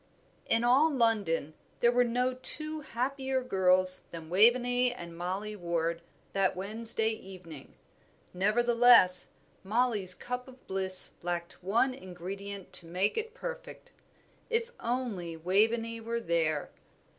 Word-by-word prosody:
_ -, -, -36 dB, 0.4 s
In 230 Hz, +1 st, +1 dB
all 265 Hz, +6 st, +4 dB
London 210 Hz, -, 0 dB, 0.3 s
there 235 Hz, -, +3 dB
were 245 Hz, 0 st, +3 dB
no 250 Hz, +2 st, -1 dB
two 305 Hz, +4 st, +5 dB
happier 265 Hz, 0 st, -3 dB
girls 185 Hz, -4 st, +3 dB
than 165 Hz, -1 st, -10 dB
Waveney 245 Hz, +5 st, +3 dB
and 170 Hz, -8 st, -9 dB
Mollie 190 Hz, +5 st, -5 dB
Ward 170 Hz, -2 st, -3 dB, 0.3 s
that 195 Hz, -1 st, +1 dB
Wednesday 220 Hz, +3 st, +2 dB
evening; 185 Hz, -8 st, -11 dB, 0.6 s
nevertheless, 230 Hz, 0 st, +4 dB, 0.3 s
Mollie's 210 Hz, -3 st, 0 dB
cup 250 Hz, +5 st, -6 dB
of 260 Hz, 0 st, -16 dB
bliss 190 Hz, -1 st, +1 dB
lacked 175 Hz, 0 st, -5 dB
one 230 Hz, +7 st, +1 dB
ingredient 195 Hz, -2 st, -9 dB
to 170 Hz, -, -1 dB
make 185 Hz, +5 st, -1 dB
it 450 Hz, +1 st, -5 dB
perfect. -, -, -9 dB, 0.6 s
If 460 Hz, 0 st, -1 dB
only 225 Hz, -9 st, -4 dB
Waveney 225 Hz, +6 st, 0 dB
were 230 Hz, +1 st, -3 dB
there! 165 Hz, -7 st, -1 dB
215 Hz, 120 wpm, -29 LUFS, 180-245 Hz, 0.6 s, two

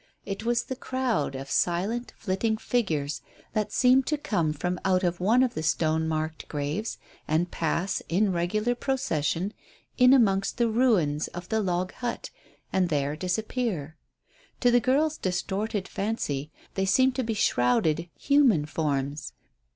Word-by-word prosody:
It 195 Hz, +1 st, -4 dB
was 235 Hz, 0 st, +1 dB
the 260 Hz, -, -5 dB
crowd 250 Hz, -, -1 dB
of 135 Hz, +1 st, -6 dB
silent 200 Hz, +8 st, 0 dB
flitting 220 Hz, +3 st, -1 dB
figures 160 Hz, -13 st, -1 dB, 0.3 s
that 215 Hz, -1 st, -1 dB
seemed 255 Hz, +2 st, +4 dB
to 300 Hz, -, +1 dB
come 175 Hz, -, 0 dB
from 180 Hz, +4 st, -2 dB
out 185 Hz, 0 st, +2 dB
of 175 Hz, -1 st, 0 dB
one 225 Hz, +8 st, +4 dB
of 255 Hz, -, 0 dB
the 155 Hz, -, -3 dB
stone 160 Hz, 0 st, +1 dB
marked 155 Hz, 0 st, -3 dB
graves, 150 Hz, +9 st, -3 dB, 0.3 s
and 165 Hz, +3 st, +1 dB
pass, 170 Hz, +4 st, -1 dB
in 195 Hz, +4 st, +2 dB
regular 210 Hz, +7 st, 0 dB
procession, 200 Hz, -, -1 dB, 0.5 s
in 250 Hz, 0 st, +7 dB
amongst 200 Hz, -7 st, +3 dB
the 235 Hz, -1 st, +3 dB
ruins 205 Hz, -, +2 dB
of 175 Hz, 0 st, -8 dB
the 220 Hz, 0 st, +1 dB
log 185 Hz, -1 st, -1 dB
hut, 245 Hz, -1 st, -4 dB, 0.4 s
and 185 Hz, -2 st, +2 dB
there 145 Hz, -1 st, 0 dB
disappear. 185 Hz, -, -2 dB, 0.7 s
To 245 Hz, -, +5 dB
the 245 Hz, -, +5 dB
girls' 295 Hz, +5 st, +1 dB
distorted 190 Hz, +2 st, -2 dB
fancy 155 Hz, -9 st, -2 dB, 0.2 s
they 195 Hz, -, 0 dB
seemed 260 Hz, +6 st, +4 dB
to 260 Hz, -, +1 dB
be 225 Hz, -1 st, -2 dB
shrouded 155 Hz, +2 st, +2 dB
human 265 Hz, -, +4 dB
forms. 145 Hz, -1 st, -2 dB
190 Hz, 150 wpm, -27 LUFS, 160-235 Hz, 0.7 s, in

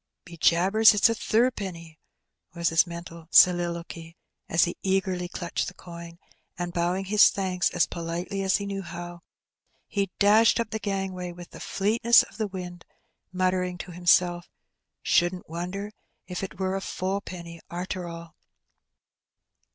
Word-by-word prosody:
'^ -, -, -58 dB
Be 170 Hz, -, -11 dB
jabbers! 195 Hz, +7 st, +5 dB
it's 210 Hz, -, +5 dB
a -, -, +1 dB
thrip'ny,'' 195 Hz, -9 st, -1 dB, 0.6 s
was 170 Hz, -1 st, +1 dB
his 165 Hz, +2 st, +3 dB
mental 170 Hz, -1 st, -9 dB
soliloquy, 170 Hz, -2 st, +3 dB, 0.3 s
as 165 Hz, +2 st, +4 dB
he 175 Hz, -, -1 dB
eagerly 190 Hz, -2 st, 0 dB
clutched 175 Hz, -1 st, -3 dB
the 195 Hz, -, -8 dB
coin; 170 Hz, -1 st, -10 dB, 0.4 s
and 175 Hz, 0 st, -4 dB
bowing 180 Hz, +3 st, -1 dB
his 210 Hz, +2 st, +6 dB
thanks 185 Hz, -3 st, 0 dB
as 175 Hz, -, +2 dB
politely 175 Hz, +4 st, -4 dB
as 190 Hz, -1 st, +2 dB
he 200 Hz, -, -5 dB
knew 195 Hz, -1 st, -4 dB
how, 175 Hz, -1 st, -8 dB, 0.6 s
he 200 Hz, -2 st, -2 dB
dashed 215 Hz, +3 st, +5 dB
up 230 Hz, -2 st, -2 dB
the 220 Hz, -, -2 dB
gangway 190 Hz, -3 st, -3 dB
with 175 Hz, 0 st, -12 dB
the -, -, -11 dB
fleetness 230 Hz, +4 st, +3 dB
of -, -, -15 dB
the 215 Hz, -2 st, -1 dB
wind, 180 Hz, -3 st, -8 dB, 0.5 s
muttering 185 Hz, -1 st, 0 dB
to 175 Hz, +1 st, -8 dB
himself, 175 Hz, 0 st, +2 dB, 0.6 s
'^Shouldn't 175 Hz, +1 st, +1 dB
wonder 180 Hz, +5 st, -5 dB, 0.3 s
if't 185 Hz, +1 st, -6 dB
was 190 Hz, 0 st, -1 dB
a -, -, -5 dB
fo'penny, 180 Hz, -4 st, -5 dB
arter 180 Hz, 0 st, -4 dB
all.' 170 Hz, -1 st, -9 dB
180 Hz, 145 wpm, -26 LUFS, 170-195 Hz, 0.6 s, his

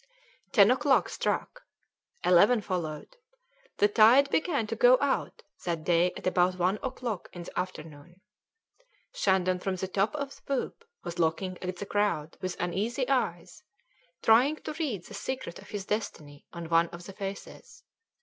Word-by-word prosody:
Ten 210 Hz, -3 st, +6 dB
o'clock 265 Hz, +1 st, +3 dB
struck. -, -, -2 dB, 0.6 s
Eleven 200 Hz, +7 st, +5 dB
followed. 180 Hz, -, -5 dB, 0.6 s
The 205 Hz, -, +5 dB
tide 230 Hz, +6 st, +5 dB
began 315 Hz, -8 st, +1 dB
to -, -, -4 dB
go -, -, +6 dB
out -, -, -1 dB, 0.2 s
that 170 Hz, -3 st, -2 dB
day 175 Hz, +2 st, +3 dB
at -, -, -10 dB
about 180 Hz, 0 st, +2 dB
one 185 Hz, +3 st, +1 dB
o'clock 245 Hz, -6 st, -4 dB
in 175 Hz, -, -7 dB
the -, -, -5 dB
afternoon. 170 Hz, -1 st, -7 dB, 0.9 s
Shandon 185 Hz, -2 st, +1 dB
from 190 Hz, +1 st, -2 dB
the 190 Hz, +1 st, -4 dB
top 195 Hz, +7 st, 0 dB
of 280 Hz, -2 st, -4 dB
the -, -, -20 dB
poop 280 Hz, -, -4 dB, 0.2 s
was 170 Hz, 0 st, -6 dB
looking 175 Hz, +3 st, 0 dB
at 185 Hz, 0 st, -4 dB
the 200 Hz, -, -6 dB
crowd 200 Hz, -7 st, -1 dB
with 185 Hz, -1 st, -4 dB
uneasy 205 Hz, -, -1 dB
eyes, -, -, -1 dB, 0.6 s
trying 250 Hz, +7 st, +5 dB
to 310 Hz, -, -7 dB
read 270 Hz, -, -3 dB
the -, -, -12 dB
secret 205 Hz, -3 st, -5 dB
of -, -, -15 dB
his 205 Hz, -2 st, -5 dB
destiny 155 Hz, -9 st, -5 dB
on 170 Hz, -1 st, -7 dB
one 165 Hz, 0 st, +4 dB
of 175 Hz, 0 st, -10 dB
the 195 Hz, -, -9 dB
faces. 195 Hz, 0 st, -8 dB
195 Hz, 160 wpm, -28 LUFS, 175-240 Hz, 0.9 s, Ten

